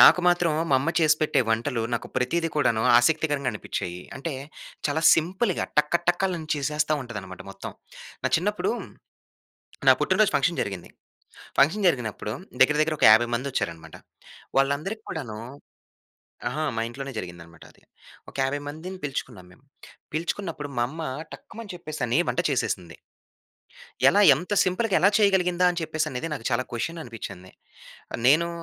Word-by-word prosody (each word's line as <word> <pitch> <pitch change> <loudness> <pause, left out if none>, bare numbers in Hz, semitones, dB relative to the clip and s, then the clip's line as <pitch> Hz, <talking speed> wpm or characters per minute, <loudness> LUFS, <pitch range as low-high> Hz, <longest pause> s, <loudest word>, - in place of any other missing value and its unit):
నాకు 180 - +9
మాత్రం 175 -2 +3 0.2
మా - - +5
అమ్మ 160 +4 0
చేసిపెట్టే 155 -3 +3
వంటలు 115 +1 0
నాకు - - -4
ప్రతీది 165 +7 +1
కూడాను 115 -6 +2 0.2
ఆసక్తికరంగా 145 0 +1
అనిపించాయి. 90 0 -5 0.2
అంటే, 150 +4 -4 0.6
చాలా 160 +3 -1
సింపుల్‌గా 185 +5 0
టకటకలను 170 +2 +1
చేసేస్తా 150 +1 0
ఉంటది 120 -4 -7
అన్నమాట 95 -1 -10
మొత్తం. - - -8 0.5
నా - - +1
చిన్నప్పుడు, 210 - 0 1.2
నా - - +11
పుట్టినరోజు 205 +1 +3
ఫంక్షన్ 170 -1 +2
జరిగింది. 95 -3 -6 0.7
ఫంక్షన్ 175 +9 +3
జరిగినప్పుడు 115 -8 -1 0.3
దగ్గర 150 +3 +6
దగ్గర 155 0 +1
ఒక - - +5
50 120 +2 +6
మంది 130 +4 -3
వచ్చారన్నమాట. 85 -10 -4 0.6
వాళ్ళందరికీ 150 +11 0
కూడాను 125 -9 -5 1.1
అహా! 155 - -3
మా 115 - 0
ఇంట్లోనే 135 +3 -6
జరిగింది 85 -3 -7
అన్నమాట 85 0 -16
అది. - - -24 0.5
ఒక - - -23
50 140 +2 -1
మందిని 170 +6 -7
పిలుచుకున్నాం 125 -9 -5
మేము. 95 - -22 0.5
పిలుచుకున్నప్పుడు 165 -1 -3
మా - - +3
అమ్మ 160 +4 -7 0.3
టక్కుమని 225 -4 -9
చెప్పేసి 155 -3 -7
అని 120 +5 +1
వంట - - +1
చేసేసింది. 90 -9 -2 1.1
ఎలా 205 - +4
ఎంత 180 +9 -5
సింపుల్‌గా 190 +3 +1
ఎలా 195 - +6
చేయగలిగిందా 180 -3 +3
అని 175 - -4
చెప్పేసి 155 -3 -2
నాకు 125 -6 -7
చాలా 130 +1 +1
క్వశ్చన్ 165 +8 -3
అనిపించింది. 95 -6 -9 0.7
నేను 160 +6 +5
150 Hz, 140 wpm, -25 LUFS, 120-175 Hz, 1.2 s, నా